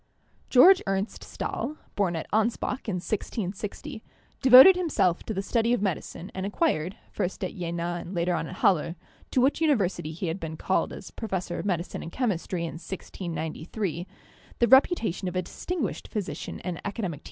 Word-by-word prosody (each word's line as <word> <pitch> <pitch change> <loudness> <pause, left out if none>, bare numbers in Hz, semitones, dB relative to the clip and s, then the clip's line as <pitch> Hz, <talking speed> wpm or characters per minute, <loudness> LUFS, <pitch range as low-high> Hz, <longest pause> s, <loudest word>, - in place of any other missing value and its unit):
Georg 360 +9 +8
Ernst 195 +2 -2
Stahl, 300 - -4 0.2
born 190 -4 +1
at 160 - -3
Anspach 230 +3 0
in 195 - -1
1660, 210 - -4 0.4
devoted 260 +8 +10
himself 210 - +1
to - - -4
the 195 - -1
study 230 +2 +1
of 245 - +1
medicine 185 0 -3
and 190 - -4
acquired, 200 - 0
first 185 +2 -3
at 185 - -3
Jena 175 0 -3
and 180 - -8
later 175 +1 +1
on - - -1
at 185 - -8
Halle 170 -3 +2 0.2
— - - -29
to 255 - +2
which 275 +5 +2
university 200 - +1
he 165 +4 -5
had 165 +3 -2
been 160 -2 -5
called 190 - 0
as 190 - -9
professor 190 -6 -3
of - - -3
medicine 175 -2 -2
and 165 - -7
chemistry 185 -7 -1
in 165 -1 -5
1693 170 0 -4 0.2
— - - -25
the 235 - +3
reputation 230 - +4
of 180 - -4
a 185 - 0
distinguished 320 - -4
physician 205 -4 -4
and 180 -2 -4
academic 205 - -5
THE 230 - -3
PHLOGISTIC 170 -8 -3
190 Hz, 180 wpm, -27 LUFS, 175-230 Hz, 0.4 s, devoted